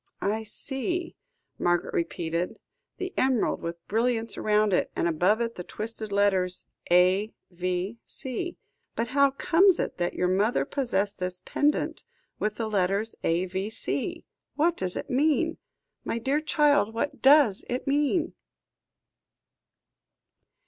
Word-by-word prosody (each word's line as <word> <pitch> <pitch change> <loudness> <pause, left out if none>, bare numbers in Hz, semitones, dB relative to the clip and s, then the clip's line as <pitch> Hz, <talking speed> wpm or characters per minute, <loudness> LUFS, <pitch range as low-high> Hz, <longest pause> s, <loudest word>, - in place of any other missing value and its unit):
"I 215 +2 0
see," 275 - -3 0.4
Margaret 175 0 +1
repeated; 170 +1 -2 0.4
"the 375 0 -4
emerald 260 -4 +1
with 170 0 -6
brilliants 230 +1 0
round 210 -1 +2
it, - - +2
and - - +1
above 180 +7 +2
it 230 0 -1
the 180 - -7
twisted 215 +2 -5
letters 190 -3 +1 0.2
A.V.C. 190 - -1 0.4
But 230 0 -1
how 280 +1 +4
comes 345 +7 +4
it - - -3
that 175 0 -1
your 180 - +1
mother 200 +6 +2
possessed 210 -8 -1
this 180 0 -3
pendant 295 +1 0 0.4
with 210 0 -1
the 225 0 -2
letters 200 +2 0
A.V.C.? 185 +5 -1 0.3
What 335 +3 +2
does 180 - -1
it - - -5
mean? 310 +5 +2 0.5
My - - -2
dear 270 +6 0
child, 290 -8 +2
what 285 +5 -2
does 270 -7 +6
it 250 +1 -2
mean?" 295 +4 +1
220 Hz, 120 wpm, -27 LUFS, 185-275 Hz, 0.5 s, does